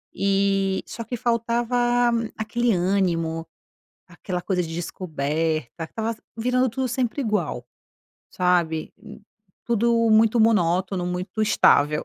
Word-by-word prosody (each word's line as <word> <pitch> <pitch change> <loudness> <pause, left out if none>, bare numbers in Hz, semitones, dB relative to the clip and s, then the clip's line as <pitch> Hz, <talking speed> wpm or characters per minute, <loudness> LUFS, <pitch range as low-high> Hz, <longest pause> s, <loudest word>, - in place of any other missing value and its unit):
eh 195 -1 +1
só 230 - -7
que 245 +1 -5
faltava 240 +1 +1 0.3
aquele 235 +1 0
ânimo, 175 -3 0 0.6
aquela 180 -3 -5
coisa 180 -2 0
de 165 -1 -5
descoberta. 160 -2 -3
Estava 225 +5 -4 0.2
virando 250 +2 +1
tudo 260 +3 -2
sempre 255 +2 -1
igual. 190 - -2 0.6
Sabe. 175 -3 0 0.7
Tudo 230 0 +2
muito 225 +1 +4
monótono, 185 -3 +2
muito 180 +4 -3
estável. 150 -8 +3
200 Hz, 105 wpm, -23 LUFS, 175-230 Hz, 0.7 s, muito